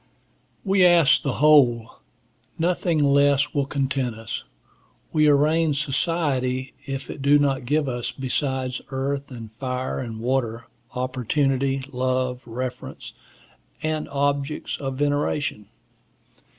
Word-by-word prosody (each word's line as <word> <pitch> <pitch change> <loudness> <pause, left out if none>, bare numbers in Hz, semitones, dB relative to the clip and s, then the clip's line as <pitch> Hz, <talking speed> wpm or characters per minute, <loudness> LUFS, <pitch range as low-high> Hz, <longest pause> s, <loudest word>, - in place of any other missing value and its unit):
We 195 -1 +4
ask 170 -5 +6
the 140 - -1
whole. 125 -7 +4 0.6
Nothing 170 -2 +1
less 140 0 +3
will 140 -2 0
content 135 -4 -1
us. 115 -1 -6 0.7
We 155 -1 +4
arraign 150 +2 +3
society 135 -3 -1
if 135 0 -5
it 145 - -8
do 140 +2 +5
not 135 -3 +1
give 150 +1 +1
us 120 -2 -3
besides 130 -1 -2
earth, 140 +1 -3
and 115 -4 -9
fire, 130 -1 -3
and 115 -3 -5
water, 120 -1 -1 0.3
opportunity, 135 +1 0
love, 130 0 -1
reverence, 125 +2 -6 0.7
and 155 -1 -2
objects 140 +1 -1
of 135 -2 -4
veneration. 145 -6 -1
135 Hz, 110 wpm, -24 LUFS, 130-145 Hz, 0.7 s, ask